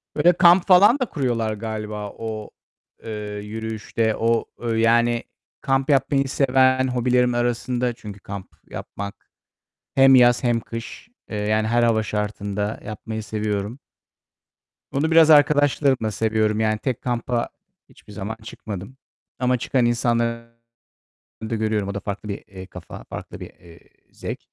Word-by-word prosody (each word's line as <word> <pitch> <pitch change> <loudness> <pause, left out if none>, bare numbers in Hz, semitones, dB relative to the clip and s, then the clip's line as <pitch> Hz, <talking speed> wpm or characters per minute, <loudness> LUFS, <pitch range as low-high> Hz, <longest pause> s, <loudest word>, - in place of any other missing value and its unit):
Böyle 170 +4 +5
kamp 175 +1 +5
falan 205 +8 +6
da 255 - +1
kuruyorlar 120 - -1
galiba 105 -1 -5
o, 110 -2 -6 0.5
eee, 115 - -6 0.3
yürüyüşte 110 +1 -2
o 115 0 +1 0.3
yani 120 +1 +3 0.4
kamp 135 +1 0
yapmayı 135 0 +2
seven 130 -1 +3
hobilerim 125 0 +2
arasında 120 +1 -1
çünkü 105 -3 -10
kamp 100 -2 -8 0.2
yapmak, 100 0 -8 0.7
hem 135 0 +7
yaz 120 0 +5
hem 120 -1 +2
kış. 115 - -8 0.2
Eee, 105 - -4
yani 110 +1 +1
her 120 +1 +2
hava 115 -2 +3
şartında 105 0 -3
yapmayı 110 +1 -6
seviyorum. 105 +3 -3 1.1
Onu 155 +4 0
biraz 160 -1 +6
arkadaşlarımla 145 -5 +4
seviyorum. 110 0 0
Yani 110 -1 +1
tek 125 +1 -3
kampa 120 -1 -1 0.4
hiçbir 105 - -17
zaman 105 +2 -5
çıkmadım 105 +2 -8 0.4
ama 125 -1 +1
çıkan 125 +1 +1
insanları 115 0 -1 0.9
da 115 - -1
görüyorum. 110 -2 -1
O 100 - -3
da 100 - -3
farklı, 100 +1 -5
eee, 100 - -7
bir 95 -2 -10
kafa, 90 -3 -10
farklı - - -9
bir, - - -8
eee, 85 -1 -17 0.3
zevk. - - -6
115 Hz, 135 wpm, -22 LUFS, 105-130 Hz, 1.1 s, hem